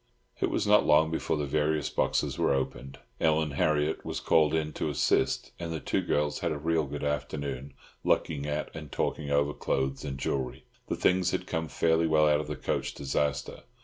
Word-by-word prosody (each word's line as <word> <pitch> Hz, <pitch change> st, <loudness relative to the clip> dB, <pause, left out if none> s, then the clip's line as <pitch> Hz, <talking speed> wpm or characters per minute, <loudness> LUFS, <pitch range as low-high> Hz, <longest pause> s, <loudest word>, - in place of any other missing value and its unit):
It -, -, +1 dB
was -, -, 0 dB
not -, -, +5 dB
long 80 Hz, +1 st, +4 dB
before 80 Hz, -, -1 dB
the 75 Hz, -, -1 dB
various 75 Hz, +1 st, 0 dB
boxes -, -, 0 dB
were -, -, +3 dB
opened. 65 Hz, 0 st, -4 dB, 0.2 s
Ellen 80 Hz, -1 st, +2 dB
Harriott 75 Hz, +2 st, +1 dB
was -, -, -4 dB
called 80 Hz, -2 st, +3 dB
in 75 Hz, -1 st, -1 dB
to -, -, -2 dB
assist, -, -, +1 dB
and 85 Hz, -1 st, -4 dB
the 80 Hz, -, -3 dB
two -, -, 0 dB
girls 75 Hz, 0 st, 0 dB
had 85 Hz, -, -1 dB
a 75 Hz, -, -2 dB
real 80 Hz, +1 st, +1 dB
good 75 Hz, +2 st, -5 dB
afternoon, 70 Hz, -2 st, -3 dB, 0.3 s
looking 75 Hz, -2 st, +1 dB
at 75 Hz, +1 st, -3 dB
and 75 Hz, -3 st, -8 dB
talking 75 Hz, -2 st, -2 dB
over 70 Hz, 0 st, +2 dB
clothes 70 Hz, 0 st, -1 dB
and 65 Hz, -1 st, -4 dB
jewellery. 65 Hz, -1 st, -2 dB, 0.2 s
The -, -, -1 dB
things 90 Hz, -1 st, +2 dB
had 95 Hz, -, -2 dB
come 80 Hz, -2 st, -2 dB
fairly 80 Hz, +1 st, +2 dB
well 75 Hz, -1 st, +4 dB
out 75 Hz, 0 st, +3 dB
of 75 Hz, -, -7 dB
the 75 Hz, -, -3 dB
coach -, -, -2 dB
disaster. 70 Hz, +1 st, -2 dB
75 Hz, 195 wpm, -29 LUFS, 70-80 Hz, 0.3 s, not